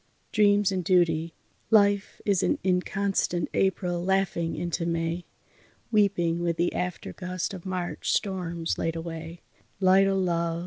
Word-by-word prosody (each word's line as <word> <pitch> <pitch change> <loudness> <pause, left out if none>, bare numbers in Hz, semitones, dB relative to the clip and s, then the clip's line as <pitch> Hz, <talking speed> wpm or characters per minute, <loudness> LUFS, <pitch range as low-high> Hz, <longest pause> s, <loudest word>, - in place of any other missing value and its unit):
DREAMS 205 -2 +4
AND 185 -1 -1
DUTY 165 -2 +2 0.3
Life 205 -2 +3
is 200 -4 +2
an - - +1
inconstant 185 -1 0
April 180 -2 0
laughing 190 -3 0
into 175 0 -2
May, 165 +1 -2 0.7
Weeping 190 -6 +2
with 170 -1 -1
the 175 +1 +1
aftergust 180 +1 -4
of 185 -1 -8
March 180 -2 -2
storms 175 -4 -1
laid 165 0 -1
away, 165 0 -6 0.4
Light 190 0 +5
o' 195 0 +1
love! 170 -2 0
180 Hz, 130 wpm, -27 LUFS, 170-195 Hz, 0.7 s, Light